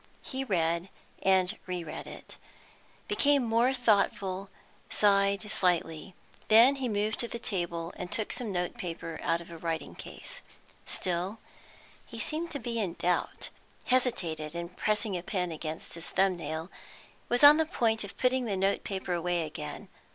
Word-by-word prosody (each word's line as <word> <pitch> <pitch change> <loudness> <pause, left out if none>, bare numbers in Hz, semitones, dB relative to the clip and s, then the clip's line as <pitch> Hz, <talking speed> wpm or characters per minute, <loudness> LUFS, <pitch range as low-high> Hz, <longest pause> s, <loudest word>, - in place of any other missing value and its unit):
He 265 0 -3
read 170 -5 +1 0.3
and 190 +1 +3
re 180 -2 -2
read 155 - -7
it, - - -10 0.7
became 290 -10 +3
more 235 +2 +3
thoughtful, 200 -5 +1 0.4
sighed 200 -1 +3
slightly. 175 -2 +1 0.3
Then 235 +6 +7
he 260 -2 -1
moved 210 0 0
to 235 - +1
the 235 - -5
table 175 -6 -3
and 180 -1 -6
took 215 +4 0
some 235 -4 -3
note 180 -1 -2
paper 165 -2 -5
out 170 - +1
of 170 - -12
a 165 - -8
writing 165 -1 -3
case. - - -9 0.5
Still 180 +4 -2 0.7
he - - -10
seemed 325 +2 -2
to 290 - -3
be 235 -1 -2
in 185 -6 -1
doubt, 180 0 -1 0.3
hesitated 175 -12 0
in 170 0 -4
pressing 210 +2 0
a 175 - -2
pen 180 -1 -1
against 160 0 -5
his 165 0 -4
thumb 190 -1 +3
nail, 165 0 -5 0.6
was 245 +3 +2
on 290 +1 +11
the 320 -1 +2
point 225 -9 +1
of 200 - -9
putting 255 0 +2
the 200 -4 -1
note 195 +1 +1
paper 190 -2 -3
away 175 -1 0
again. 150 - -7
195 Hz, 160 wpm, -30 LUFS, 170-230 Hz, 0.7 s, on